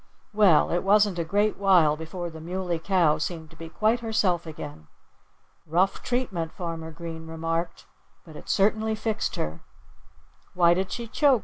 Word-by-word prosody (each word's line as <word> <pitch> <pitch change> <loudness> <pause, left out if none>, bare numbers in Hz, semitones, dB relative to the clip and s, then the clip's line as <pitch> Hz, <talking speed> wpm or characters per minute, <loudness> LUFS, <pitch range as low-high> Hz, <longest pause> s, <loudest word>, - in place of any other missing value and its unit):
Well, 200 -7 +5
it 175 - +1
wasn't 205 -2 +3
a - - +1
great 205 +5 +1
while 180 -6 +4
before 170 +2 -6
the 160 0 -10
Muley 175 0 -3
Cow 170 -3 +2
seemed 160 -1 -4
to - - -15
be 165 0 -9
quite 220 +7 +1
herself 200 -7 0
again. 145 - -8 0.8
"Rough 180 +5 +1
treatment!" 195 -10 -2
Farmer 165 -2 -5
Green 165 0 -8
remarked. 165 +1 -3 0.4
"But 160 -3 -13
it - - -11
certainly 220 +2 +2
fixed 220 0 -2
her." 75 +1 -4 1.0
"Why 170 -1 +5
did 190 +1 -2
she 235 -1 -4
choke?" 270 +2 +3
175 Hz, 155 wpm, -26 LUFS, 160-205 Hz, 1.0 s, Well